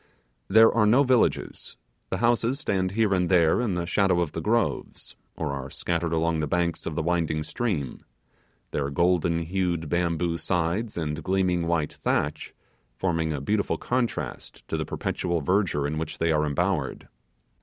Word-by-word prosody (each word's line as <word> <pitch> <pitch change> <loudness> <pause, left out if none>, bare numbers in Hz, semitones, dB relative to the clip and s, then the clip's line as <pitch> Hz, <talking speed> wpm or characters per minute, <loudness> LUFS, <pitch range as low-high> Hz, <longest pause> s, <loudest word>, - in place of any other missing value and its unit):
There 110 +3 +7
are 110 -2 +3
no 125 +6 +5
villages; 125 -3 0 0.3
the - - -1
houses 120 +2 +1
stand 95 -9 -1
here 110 -2 +2
and 90 -2 +1
there 85 +3 +4
in 110 -7 -1
the 85 -1 -2
shadow 95 0 +2
of 85 -4 0
the 80 - -4
groves, 115 +4 -1 0.2
or 80 -3 -3
are 70 -1 -5
scattered 85 +2 -2
along 80 0 +1
the 75 - -1
banks 85 +1 -1
of 80 - -4
the 80 - -1
winding 80 -2 0
stream; 80 - -3 0.7
their 70 -1 -1
golden 85 +2 +1
hued 85 -2 -1
bamboo 85 0 0
sides 90 +7 -1
and 75 -1 -3
gleaming 90 -2 +1
white 85 -3 0
thatch 75 +1 -2 0.4
forming 80 -4 0
a 75 - -2
beautiful 100 +9 0
contrast 120 - -3
to - - -1
the - - -2
perpetual 85 -2 -2
verdure 85 -2 +1
in 75 +2 -2
which 80 -1 -5
they 85 0 +1
are 75 -1 +2
embowered. 70 - -1
85 Hz, 165 wpm, -26 LUFS, 80-95 Hz, 0.7 s, There